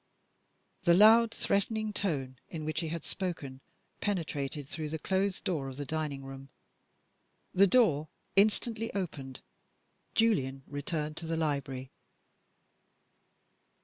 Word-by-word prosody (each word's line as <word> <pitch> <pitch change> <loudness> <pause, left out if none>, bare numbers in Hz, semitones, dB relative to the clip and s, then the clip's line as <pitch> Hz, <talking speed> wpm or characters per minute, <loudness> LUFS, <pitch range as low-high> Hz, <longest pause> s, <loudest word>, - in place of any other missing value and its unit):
The 170 -2 +6
loud 225 +3 +7
threatening 215 +1 0
tone 135 -11 -2
in 155 -2 -5
which 155 0 -1
he 165 - -2
had 165 0 -4
spoken 145 -8 -4 0.4
penetrated 150 -7 -2
through 155 0 -4
the 160 - -2
closed 190 +4 0
door 155 -7 -1
of 135 -1 -7
the 145 - -4
dining 150 -2 -3
room. 135 0 -9 1.0
The 195 +2 +6
door 175 - +4 0.3
instantly 220 +3 +3
opened. 140 -9 -4 0.7
Julian 135 -13 +2
returned 150 +2 -3
to 165 - -5
the 165 0 -1
library. 140 -4 -2
160 Hz, 115 wpm, -31 LUFS, 140-195 Hz, 1.0 s, loud